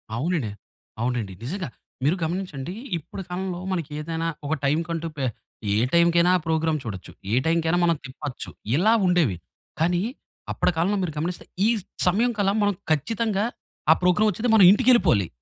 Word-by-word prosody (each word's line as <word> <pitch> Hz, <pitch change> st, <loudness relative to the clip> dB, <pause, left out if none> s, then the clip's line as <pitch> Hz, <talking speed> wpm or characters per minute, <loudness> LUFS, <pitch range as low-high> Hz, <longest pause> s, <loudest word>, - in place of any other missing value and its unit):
అవునండి. 140 Hz, -, -1 dB, 0.5 s
అవునండి. 120 Hz, -5 st, -1 dB
నిజంగా. 170 Hz, +4 st, -4 dB, 0.3 s
మీరు 155 Hz, +6 st, +3 dB
గమనించండి 170 Hz, -2 st, -3 dB, 0.2 s
ఇప్పుడు 165 Hz, +4 st, -8 dB
కాలంలో 180 Hz, 0 st, -3 dB
మనకేదైనా 165 Hz, 0 st, -3 dB, 0.2 s
ఒక 155 Hz, -, 0 dB
టైమ్‌కంటూ 165 Hz, +3 st, 0 dB
పే 135 Hz, -, -1 dB, 0.5 s
ఏ -, -, +2 dB, 0.2 s
టైమ్‌కైనా 170 Hz, +1 st, +5 dB
ఆ -, -, -4 dB
ప్రోగ్రామ్ 160 Hz, -1 st, +1 dB
చూడొచ్చు, 100 Hz, -5 st, -7 dB, 0.2 s
ఏ -, -, +1 dB
టైమ్‌కైనా 165 Hz, +1 st, +2 dB
మనం 170 Hz, -1 st, +3 dB
తిప్పొచ్చు. 130 Hz, +1 st, -6 dB, 0.3 s
ఇలా 215 Hz, +9 st, +4 dB
ఉండేవి. 165 Hz, -, +2 dB, 0.4 s
కానీ, 175 Hz, +2 st, +2 dB, 0.5 s
అప్పటి -, -, +1 dB
కాలంలో 195 Hz, +5 st, +2 dB
మీరు 160 Hz, -, -3 dB
గమనిస్తే, 175 Hz, +3 st, -3 dB, 0.2 s
ఈ -, -, +4 dB, 0.4 s
సమయంకల్లా 205 Hz, 0 st, +2 dB
మనం 205 Hz, 0 st, +2 dB, 0.2 s
ఖచ్చితంగా 210 Hz, -, +1 dB, 0.5 s
ఆ -, -, +10 dB
ప్రోగ్రామ్ 180 Hz, +4 st, +4 dB
ఒచ్చేది 230 Hz, +4 st, 0 dB
మనం 195 Hz, -4 st, +8 dB
ఇంటికేళ్ళిపోవాలి. 215 Hz, -, +4 dB
170 Hz, 140 wpm, -24 LUFS, 150-190 Hz, 0.5 s, ఆ